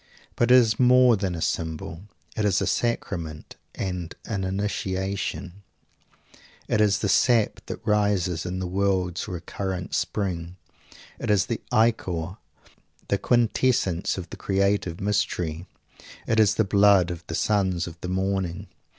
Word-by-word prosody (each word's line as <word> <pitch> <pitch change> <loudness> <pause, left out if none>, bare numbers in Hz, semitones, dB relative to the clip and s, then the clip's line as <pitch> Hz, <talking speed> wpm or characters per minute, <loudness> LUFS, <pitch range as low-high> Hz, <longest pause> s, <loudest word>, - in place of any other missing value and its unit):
But 120 - +2
it 125 - +8
is 115 -4 +4
more 125 -1 +6
than 95 -3 -2
a 85 - -3
symbol 80 +2 -3 0.3
it 110 - -1
is 100 -2 +2
a - - 0
sacrament 85 -9 -2 0.2
and 90 -3 -4
an 100 -4 -3
initiation. 95 -1 -3 1.1
It 105 - +2
is 105 -1 +3
the 105 - -1
sap 110 +2 +3
that - - -7
rises 100 -5 +1
in 90 +1 -4
the 95 - -3
world's 95 -1 0
recurrent 90 +1 -5
spring. 90 -4 -2 0.6
It - - -4
is 100 -1 +3
the 115 +1 -3
ichor, 95 -5 +1 0.7
the 100 - +1
quintessence 115 -7 +1
of 90 -2 -5
the - - -7
creative 100 -3 0
mystery. 95 -5 -1 0.6
It 110 - +1
is 105 -3 +4
the 110 - +3
blood 100 -3 +4
of 85 -1 -7
the 80 - -4
sons 95 -4 +1
of 85 0 -10
the 90 - -4
morning. 95 -2 -2
95 Hz, 140 wpm, -25 LUFS, 90-105 Hz, 1.1 s, it